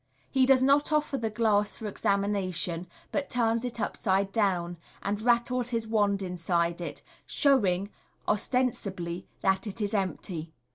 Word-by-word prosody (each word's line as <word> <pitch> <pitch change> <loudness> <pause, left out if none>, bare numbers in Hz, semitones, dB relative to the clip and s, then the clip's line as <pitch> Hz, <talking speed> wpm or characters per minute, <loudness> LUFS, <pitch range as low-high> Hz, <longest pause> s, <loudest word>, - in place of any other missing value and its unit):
He 260 -1 +4
does 265 -1 +5
not 280 +3 +4
offer 300 -1 +1
the 225 - -1
glass 210 -2 +1
for 220 - -7
examination, 190 -4 0 0.2
but 285 -1 -1
turns 230 -1 +1
it 245 -2 -4
upside 195 -2 0
down, 180 -5 0 0.3
and 205 +1 -1
rattles 240 +1 +2
his 230 -2 -1
wand 205 -3 +1
inside 170 -1 0
it, 170 - -6 0.2
showing, 200 -9 +2 0.4
ostensibly, 200 -7 -1 0.2
that 190 +2 +2
it 205 +2 -6
is 205 -1 -1
empty. 175 -4 -2
205 Hz, 140 wpm, -28 LUFS, 185-235 Hz, 0.4 s, does